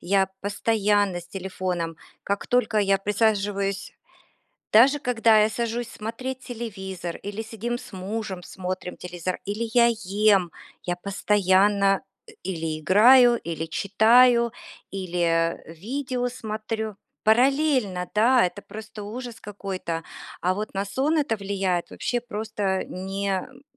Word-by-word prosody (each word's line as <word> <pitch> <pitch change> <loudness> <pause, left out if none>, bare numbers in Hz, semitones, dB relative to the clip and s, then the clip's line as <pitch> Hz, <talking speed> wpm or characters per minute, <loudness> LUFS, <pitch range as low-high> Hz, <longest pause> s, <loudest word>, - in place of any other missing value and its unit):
я 190 +1 +2
постоянно 205 -2 +1
с 175 - -15
телефоном. 180 -3 -3 0.3
Как 200 0 -2
только 245 -3 +2
я 195 -1 +3
присаживаюсь 200 -1 0 0.8
даже 265 +7 +7
когда 230 -5 +4
я 210 - +4
сажусь 235 +1 -2
смотреть 250 +4 -5
телевизор, 190 -7 -6
или 205 +2 -5
сидим 230 +2 -4
с - - -12
мужем, 190 0 -4
смотрим 185 0 -5
телевизор, 180 0 -4
или 215 +3 -3
я 240 -1 +6 0.2
ем. 200 -2 +3 0.3
Я 175 0 -2
постоянно, 195 +1 +2 0.3
э, 445 - -12
или 160 -4 -3
играю, 240 - +7
или 165 -1 -3
читаю, 235 +7 +4 0.4
или 170 -3 0
видео 245 - -3
смотрю. 220 -3 -4 0.3
Параллельно, 245 - +2
да, 240 +3 +5
это 190 +3 -3
просто 210 +1 -9
ужас 235 +1 -7
какой-то. 190 -5 -5 0.4
А 185 +1 +1
вот 210 +1 -5
на 195 +1 -1
сон 275 +10 0
это 255 -7 0
влияет 195 -3 -1
вообще 245 -1 -2
просто 210 -4 -2
не 195 +2 -4
м, 225 +8 -3
205 Hz, 125 wpm, -25 LUFS, 190-230 Hz, 0.8 s, даже